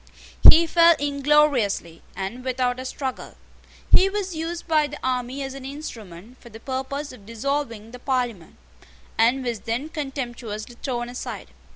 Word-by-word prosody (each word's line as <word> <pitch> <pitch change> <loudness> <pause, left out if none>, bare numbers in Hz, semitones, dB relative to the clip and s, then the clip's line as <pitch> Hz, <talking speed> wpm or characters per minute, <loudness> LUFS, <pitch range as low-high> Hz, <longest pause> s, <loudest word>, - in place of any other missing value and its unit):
He 335 +1 +8
fell 335 0 +6
ingloriously, 280 - +2
and 195 +7 -5
without 255 -1 0
a 260 - -5
struggle. 260 0 -5 0.6
He 385 - +7
was 390 -3 -3
used 330 +2 -4
by 310 -2 +3
the 295 +1 -8
army 255 +1 -1
as 270 0 -5
an 275 -1 -9
instrument 240 - -9
for 235 - -13
the 225 0 -11
purpose 265 +3 -4
of 210 -6 -14
dissolving 230 -2 -3
the 250 - -10
Parliament, 245 - -2 0.6
and 245 +4 +3
was 235 -3 -2
then 240 +9 -3
contemptuously 245 -7 -5
thrown 240 -3 -2
aside. 245 +1 -6
260 Hz, 150 wpm, -24 LUFS, 235-290 Hz, 0.6 s, He